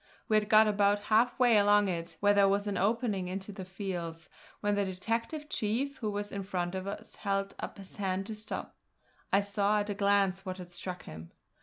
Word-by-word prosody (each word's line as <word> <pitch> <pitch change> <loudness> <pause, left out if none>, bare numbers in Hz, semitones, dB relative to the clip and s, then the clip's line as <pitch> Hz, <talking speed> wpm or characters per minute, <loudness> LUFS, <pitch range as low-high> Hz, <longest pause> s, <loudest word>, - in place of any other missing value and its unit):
We 215 - +2
had 210 0 +2
got 215 0 +7
about 205 -1 +3 0.2
half 235 +3 +4
way 240 -4 +5
along 205 0 +5
it, 170 -2 -4
where 205 0 +5
there 200 -1 +5
was 200 +1 +1
an 205 -1 -2
opening 205 -1 0
into 190 +2 -5
the 195 -1 -7
fields, 180 -3 -5 0.3
when 205 0 +1
the 205 0 +2
detective 230 - -3
chief 270 +4 -1
who 220 -6 -2
was 205 0 -3
in 200 - -3
front 180 -2 -2
of 190 0 -4
us 200 - -7
held 195 -1 -1
up - - -6
his 195 -1 -8
hand 195 -1 -1
to 220 - -5
stop. 215 0 -5 0.6
I 200 - +5
saw 200 +1 +1
at 205 0 -3
a - - 0
glance 200 -1 +2
what 185 -1 -5
had 180 -1 -9
struck 180 +1 -6
him. 80 +1 -9
200 Hz, 210 wpm, -31 LUFS, 190-210 Hz, 0.6 s, got